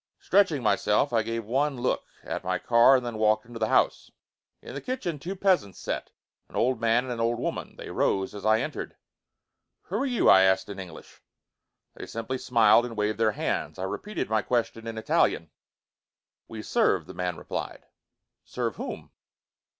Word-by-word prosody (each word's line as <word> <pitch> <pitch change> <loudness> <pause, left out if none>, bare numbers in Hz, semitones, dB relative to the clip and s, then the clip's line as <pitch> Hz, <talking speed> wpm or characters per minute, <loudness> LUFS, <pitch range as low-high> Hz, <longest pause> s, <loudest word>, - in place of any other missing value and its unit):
Stretching 180 -9 +2
myself, 105 +4 +2
I 115 - +3
gave 115 0 -4
one 135 +4 0
look 125 - -1 0.2
at - - -4
my 90 0 0
car 120 +6 +5
and 125 -1 0
then 115 -2 -4
walked 110 0 +2
into 120 -1 -9
the 110 - +1
house. - - +2 0.5
In - - -10
the 140 - -5
kitchen 215 - -3
two 180 +7 -5
peasants 185 - +1
sat, - - -4 0.4
an - - -14
old 125 -1 +1
man 115 +2 +3
and 130 -1 -4
an 115 - -6
old 115 +1 +1
woman. - - -4
They - - -8
rose 95 -1 0
as 105 - -8
I 110 +1 +3
entered. - - -5 0.9
"Who 195 - -3
are 270 - 0
you?" 245 -3 +1
I 95 - +8
asked 95 +1 +3
in 100 -1 -7
English. 90 -4 -11 0.7
They - - -9
simply 115 +3 -4
smiled 115 -1 +5
and 120 -2 -6
waved 105 +1 -1
their 110 -2 +3
hands. - - -2
I 95 - -4
repeated 205 - -4
my 110 0 +1
question 115 0 -2
in 115 -1 -5
Italian. 85 -6 +1 1.0
"We 110 -1 -8
serve," - - +2
the - - -10
man 90 -2 -3
replied. - - -6 0.6
"Serve - - -3
whom?" - - -6
115 Hz, 180 wpm, -27 LUFS, 105-130 Hz, 1.0 s, I